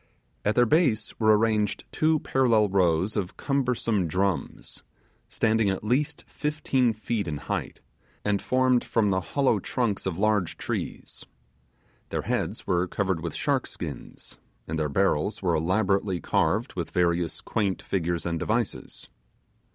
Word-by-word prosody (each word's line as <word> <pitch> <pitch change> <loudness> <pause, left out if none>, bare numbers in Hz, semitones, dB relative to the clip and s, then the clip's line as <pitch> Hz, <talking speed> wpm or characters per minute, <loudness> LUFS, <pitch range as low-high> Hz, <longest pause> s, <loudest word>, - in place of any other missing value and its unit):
At 105 - +1
their 120 - +5
base 130 -6 +2
were 110 -1 +5
arranged 105 -2 +1
two 155 0 +2
parallel 115 -6 +3
rows 95 +1 +2
of 95 -4 -3
cumbersome 125 - 0
drums, 95 +3 -2 0.5
standing 110 -2 +2
at 95 +1 -2
least 130 +7 0
fifteen 145 -5 0
feet 110 -1 -3
in 75 -2 -2
height, 70 - -4 0.4
and 105 -1 +1
formed 130 -1 +2
from 105 -3 +1
the 95 0 +1
hollow 130 +1 +1
trunks 105 -1 -1
of 90 -3 -2
large 105 -3 +1
trees. - - -5 0.9
Their - - -2
heads - - -2
were 90 0 +1
covered 95 -3 -1
with 85 -2 -4
shark - - 0
skins, - - -8 0.3
and 80 0 -2
their 75 -1 0
barrels 95 +4 +1
were 90 -2 +2
elaborately 95 +3 +1
carved - - 0
with - - -4
various 85 -1 0
quaint 100 -4 -1
figures 85 -2 -1
and 85 -1 -1
devices. 110 +2 -2
105 Hz, 140 wpm, -26 LUFS, 90-115 Hz, 0.9 s, their